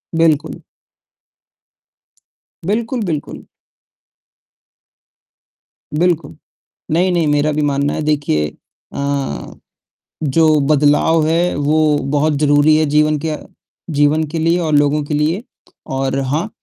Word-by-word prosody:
बिल्कुल। 160 -1 +1 2.0
बिल्कुल, 230 +6 -1
बिल्कुल। 155 -5 -4 2.6
बिल्कुल, 170 -4 0 0.6
नहीं-नहीं 175 0 +2
मेरा 145 +1 +1
भी 150 0 -1
मानना 145 0 0
है - - -3
देखिए 145 - 0 0.5
अ, 140 - -3 0.7
जो 155 +1 +3
बदलाव 150 +2 +3
है, 170 +2 +1
वो 150 +1 +2 0.2
बहुत 150 +1 +2
ज़रूरी 145 +1 +4
है 155 0 +2
जीवन 150 +1 +2
क्य 155 0 -3 0.6
जीवन 145 +2 +3
के 165 - -2
लिए 165 +2 +2
और 160 -3 -1
लोगों 145 +1 +2
के 145 +1 -5
लिए। 155 +8 0 0.5
और 135 0 -1
हाँ 150 +9 -2
150 Hz, 105 wpm, -17 LUFS, 145-160 Hz, 2.6 s, ज़रूरी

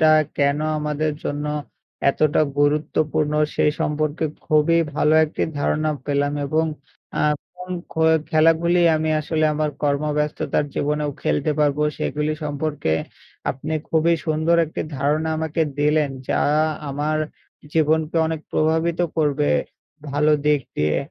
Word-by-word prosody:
টা 155 0 +6 0.3
কেন 140 0 +2 0.2
আমাদের 150 0 -1
জন্য 145 +1 -2 0.6
এতটা 155 +1 +2 0.2
গুরুত্বপূর্ণ? 150 0 +1 0.2
সেই 150 - +3
সম্পর্কে 155 +1 -1 0.2
খুবই 155 +2 +3 0.2
ভালো 155 0 +3
একটি 155 - -4 0.2
ধারণা 155 +1 +1 0.2
পেলাম 145 0 +1
এবং 155 +3 +1 0.6
আ - - +2 0.3
কোন 180 0 -9 0.2
খো 160 - 0 0.3
খেলা 160 +1 +5
গুলি 175 +1 +3 0.2
আমি 155 0 -1
আসলে 155 +1 0
আমার 150 0 0
কর্মব্যস্ততার 150 +1 0
জীবনেও 150 0 0
খেলতে 145 +2 +1
পারব। 145 -1 +2 0.2
সেগুলি 150 +1 -1
সম্পর্কে 145 - -2 0.6
আপনি 150 +4 -5 0.2
খুবই 165 +1 +3
সুন্দর 160 +2 +2
একটি 155 - -6 0.2
ধারণা 150 +4 0
আমাকে 160 0 -1 0.2
দিলেন। 150 -1 +2 0.2
যা - - +1 0.5
আমার 150 +2 -1 0.6
জীবনকে 160 +1 +2
অনেক 160 -1 -3
প্রভাবিত 160 +2 +1 0.2
করবে। 150 -2 +1 0.6
ভালো 150 +2 +3
দিক 150 -2 +4 0.2
দিয়ে 75 0 +1
150 Hz, 125 wpm, -22 LUFS, 145-155 Hz, 0.6 s, টা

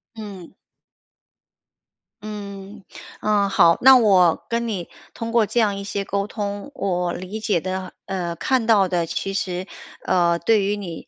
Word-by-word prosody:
嗯。 200 -5 -9 1.7
嗯， 200 -1 -8 0.4
嗯， 205 -2 +2
好， 170 -4 +5
那 265 +1 +9
我 190 -7 +4
跟 235 0 -1
你 190 -6 -4 0.3
通 230 -1 -5
过 230 -2 +3
这 240 - -1
样 210 -3 +2
一 200 - -6
些 200 0 -3
沟 200 +1 -2
通， 205 +4 -5
我 180 -7 -1
理 185 +4 -6
解 210 -5 +1
的， 185 +2 -5
呃， 175 -3 -3
看 255 +6 0
到 210 -4 +4
的 175 -2 0
其 165 +4 -4
实， 185 -1 -3 0.4
呃， 170 -2 +2
对 215 +3 +2
于 205 +1 0
你， 175 -5 -8
200 Hz, 165 characters per minute, -22 LUFS, 180-215 Hz, 1.7 s, 那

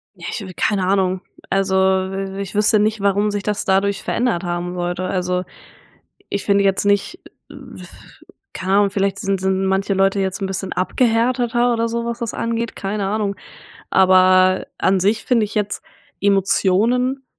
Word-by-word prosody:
Ja, - - -11
ich - - -4
habe 190 -2 -8
keine 195 -3 0
Ahnung. 190 -1 +1 0.3
Also, 195 0 +1 0.4
i 195 0 -5
ich 195 +1 -7
wüsste 210 +1 +3
nicht, 215 0 0
warum 200 +1 +1
sich 205 -1 -3
das 210 0 -2
dadurch 195 +1 +1
verändert 235 -8 -1
haben 175 0 -3
sollte. 175 0 -3
Also, 180 0 -1 0.9
ich 200 - -3
finde 200 -1 +3
jetzt 195 +1 +1
nicht 205 - +1 1.3
Keine 190 +1 -2
Ahnung, 205 -1 +3
vielleicht 195 -1 -1
sind 195 -1 -1
sind 190 0 0
manche 195 +1 0
Leute 195 +1 +2
jetzt 190 +1 -2
'n 195 - 0
bisschen 190 0 -4
abgehärteter 240 +4 +1
oder 230 0 0
so, 235 0 -3
was 235 0 -4
das 235 -2 -4
angeht, 230 0 -3
keine 195 0 -3
Ahnung, 205 -1 -1 0.5
aber 185 0 +4
an 190 0 +2
sich 210 +4 0
finde 230 -4 +2
ich 210 - -10
jetzt 210 -1 -2 0.4
Emotionen 210 +7 +1
195 Hz, 160 wpm, -19 LUFS, 190-215 Hz, 1.3 s, aber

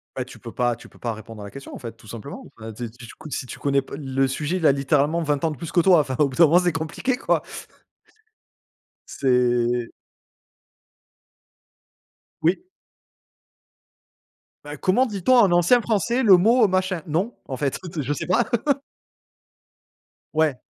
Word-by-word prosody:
Bah, 130 - -2
tu 130 - -14
peux 115 -3 -10
pas 120 -2 0
tu - - -14
peux - - -20
pas 115 -2 -3
répondre 110 0 -10
à - - -7
la 100 - -9
question, 135 0 -10
en - - -7
fait, 115 -3 -7
tout 110 - -18
simplement 115 +5 -8
enfin 110 0 -8
tu 120 +3 -6
sais - - -11
tu 120 +1 -13 0.3
si 135 - -3
tu - - -9
connais 140 -1 +1
p 135 - -9
le 135 -2 0
sujet 150 +6 -2
il 170 - -2
a - - +7
littéralement 145 +4 +1
20 145 -3 -1
ans 165 - +1
de 150 - -7
plus 170 - -7
que 175 - +5
toi, 180 -1 +6
enfin 130 -3 -1
au 145 -2 +4
bout 130 - -9
d'un 170 - +8
moment 165 +3 +5
c'est 180 -1 +1
compliqué 160 - -2
quoi. - - 0 1.6
C'est 120 -2 +1 2.5
Oui. 175 - +1 2.0
Ben: 145 0 -7
«Comment 200 +8 +3
dit-on, 210 +1 +1
on 245 - +7
en 200 -5 +4
ancien 175 +8 +5
français, 230 +2 0
le 195 -5 +8
mot, 225 +6 +4
heu, - - +3
machin?» 185 -3 -1
Non, 180 +10 -1
en 130 - -4
fait, 140 0 -2
heu, 165 -3 -4
je 145 +2 -1
sais - - -4
pas. 220 +7 +2 1.9
Ouais. 155 -4 +1
150 Hz, 180 wpm, -23 LUFS, 130-180 Hz, 2.5 s, d'un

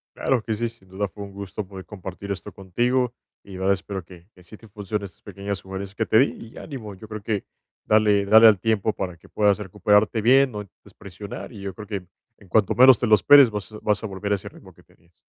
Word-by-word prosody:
Claro 125 -4 0
que 110 - -2
sí. 115 +2 -2
Sin 95 -5 -22
duda, 100 +2 -3
fue 100 +3 -10
un 100 - -9
gusto 100 +1 -6
poder 95 -1 -10
compartir 100 0 -8
esto 95 - -6
contigo, 120 +6 -1 0.3
y 100 - -13
la 95 - -7
verdad, 95 +1 +3
espero 95 -1 -5
que 90 -1 -16
que 90 - -18
sí 105 +5 -13
te 115 - -16
funcionen, 105 0 -5
estas 95 - -14
pequeñas 100 0 -5
sugerencias 95 +1 -8
que 110 - -1
te 110 - +4
di, 125 -3 +2 0.2
y - - -14
ánimo. 115 -8 -8
Yo 100 +4 -12
creo, 105 -1 -7
que 105 -2 -2 0.4
dale 105 -2 +3
dale 110 +3 +8
al 105 -4 +5
tiempo, 110 0 0
para 90 -4 -5
que - - -20
puedas 105 -2 +2
recuperarte 105 +2 +1
bien. 130 +3 +5
No 105 -1 -5
intentes 95 -6 -18
presionar, 100 +4 -9
y 105 -4 -11
yo 100 -1 -5
creo, 105 +2 -10
que 100 -4 -5 0.3
en 100 - -19
cuanto 105 +1 +2
menos 130 0 +7
te 120 - 0
lo 110 - +7
esperes, 140 +5 +7
vas 105 -1 -6
a 105 - -9
vas 105 +1 0
a - - -2
volver 100 +1 -5
a - - +4
ese 95 - -8
ritmo - - -16
que - - -22
tenías. 85 +1 -29
105 Hz, 250 wpm, -23 LUFS, 95-110 Hz, 0.4 s, dale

